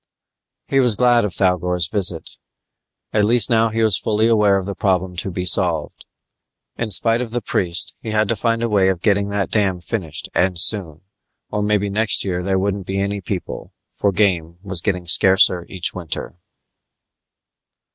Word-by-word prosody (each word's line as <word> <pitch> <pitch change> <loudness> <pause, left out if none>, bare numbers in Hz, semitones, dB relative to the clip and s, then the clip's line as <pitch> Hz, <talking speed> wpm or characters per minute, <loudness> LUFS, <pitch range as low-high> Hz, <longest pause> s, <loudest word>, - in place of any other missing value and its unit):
He 135 - +1
was 125 -5 +4
glad 120 -2 +3
of 105 - -3
Thougor's 90 -2 0
visit. 90 -4 0 0.8
At 105 - +2
least 115 0 +3
he 115 0 +1
was 110 -4 +2
now - - -22
fully 110 0 +1
aware 105 -3 +3
of 95 - -4
the 100 - -4
problem 95 -3 -1
to 95 - 0
be 90 0 -4
solved. 90 - 0 0.7
In 115 - -4
spite 115 +4 +3
of 125 - -4
the 120 +2 -2
priest, 95 -4 -2
he 110 - -8
had 110 0 +1
to 115 - +1
find 115 +2 -1
a - - +1
way 100 -4 +2
of 90 -2 -3
getting 100 -1 +1
that 100 -1 -3
dam 95 -4 0
finished 90 -4 -4
and 95 -1 0
soon. 85 -4 +3 0.5
Or 105 - -2
maybe 105 -1 0
next 110 +1 +1
year 90 -2 -2
there 95 +1 -1
wouldn't 100 0 -2
be 95 - -3
any 100 0 -2
people, 90 0 -6 0.2
for 100 - -1
game 90 -4 0
was 95 -4 -4
getting 90 -3 -2
scarcer 90 0 +4
each 90 -3 -5
winter. 85 -4 -6
100 Hz, 175 wpm, -19 LUFS, 90-110 Hz, 0.8 s, was